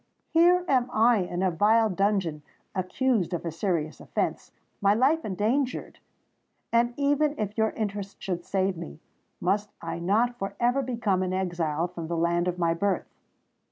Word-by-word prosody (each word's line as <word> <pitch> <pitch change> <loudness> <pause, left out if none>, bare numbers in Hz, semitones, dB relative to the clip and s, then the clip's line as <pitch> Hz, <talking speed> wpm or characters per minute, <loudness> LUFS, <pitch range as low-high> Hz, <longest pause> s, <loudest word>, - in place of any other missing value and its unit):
Here 350 +2 +5
am 255 -2 +2
I 230 +1 +4
in 180 0 -2
a 185 - +2
vile 215 +5 +3
dungeon—accused 185 - -1
of 175 - -5
a 165 - -2
serious 165 -3 -2
offence—my 200 -1 -2
life 280 +8 +3
endangered! 225 +7 -1 0.7
And, 240 +1 +3
even 290 +1 +2
if 210 -1 -3
your 220 -1 +2
interest 205 -3 -4
should 175 -2 -3
save 190 0 0
me, 70 - -8 0.4
must 205 +4 0
I - - -5
not 225 +8 +1
for 195 0 -4
ever 245 +3 +2
become 230 -7 0
an 185 0 -1
exile 175 -3 -1
from 170 -2 -7
the 170 0 -2
land 170 +1 +1
of 180 0 -1
my 170 -2 +2
birth? 195 +4 -1
200 Hz, 155 wpm, -27 LUFS, 175-240 Hz, 0.7 s, Here